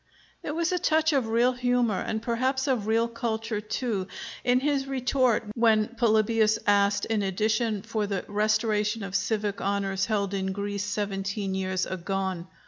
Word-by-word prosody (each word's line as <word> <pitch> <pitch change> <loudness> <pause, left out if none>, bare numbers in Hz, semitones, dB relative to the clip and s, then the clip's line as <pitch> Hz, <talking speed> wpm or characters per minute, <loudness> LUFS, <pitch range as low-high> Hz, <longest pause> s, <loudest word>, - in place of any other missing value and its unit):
There 295 - -4
was 335 +2 0
a 360 - +1
touch 315 -1 +2
of 265 -5 +1
real 235 +3 +3
humor, 245 -4 +1
and 220 0 -3
perhaps 260 +3 0
of 250 -7 0
real 225 +1 +2
culture 225 -2 -3
too, 215 -3 -2 0.4
in 250 0 +3
his 280 -1 0
retort 255 -3 +1
when 220 -2 +3
Polybius 220 -2 +2
asked 205 -1 +3
in 220 -2 0
addition 215 +2 0
for 220 -2 -2
the 195 -2 -3
restoration 210 0 +1
of 195 -1 -6
civic 205 +1 -1
honors 195 -1 0
held 200 -3 0
in 190 -1 -1
Greece 200 0 -3
seventeen 195 -1 -2
years 185 -1 -1
agone. 185 -1 -3
215 Hz, 155 wpm, -27 LUFS, 200-235 Hz, 0.4 s, real